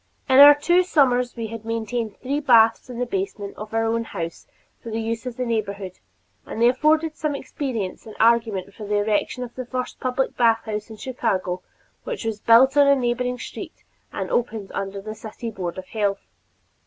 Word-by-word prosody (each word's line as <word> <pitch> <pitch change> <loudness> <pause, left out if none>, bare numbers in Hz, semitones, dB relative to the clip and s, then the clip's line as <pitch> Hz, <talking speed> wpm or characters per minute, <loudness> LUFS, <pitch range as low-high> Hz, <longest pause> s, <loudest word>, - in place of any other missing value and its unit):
In 265 0 +5
our 290 +1 +11
first 290 - -14
two 350 +1 +5
summers 250 -8 +2
we 230 -1 -4
had 225 0 -7
maintained 225 -1 -3
three 275 +3 -2
baths 230 -4 +4
in 245 - -7
the 245 - -1
basement 200 -1 -4
of 215 0 -8
our 225 0 +1
own 230 +1 0
house 170 -6 -6 0.3
for 230 - -8
the 225 0 -2
use 225 +2 -3
of 245 -1 -6
the 250 - -1
neighborhood, 200 -5 -3 0.4
and - - -7
they 235 - +5
afforded 310 +4 +2
some 300 -2 -2
experience 245 -9 -4
and 215 - -10
argument 220 -4 +2
for 215 - -10
the 210 - 0
erection 210 +4 0
of 240 -1 -8
the 255 - -5
first 255 +1 -5
public 255 +1 -1
bathhouse 225 -2 +1
in 220 - -10
Chicago, 195 -8 -2 0.4
which 485 - -5
was 220 -2 -2
built 235 +6 +5
on 285 -1 +6
a 280 - +6
neighboring 250 0 -1
street - - -9 0.3
and - - -4
opened 220 -4 -1
under 195 0 -4
the 215 +2 -7
city 220 +2 -7
Board 180 -4 -5
of 185 - -6
Health. 205 -3 -1
230 Hz, 195 wpm, -23 LUFS, 210-255 Hz, 0.4 s, our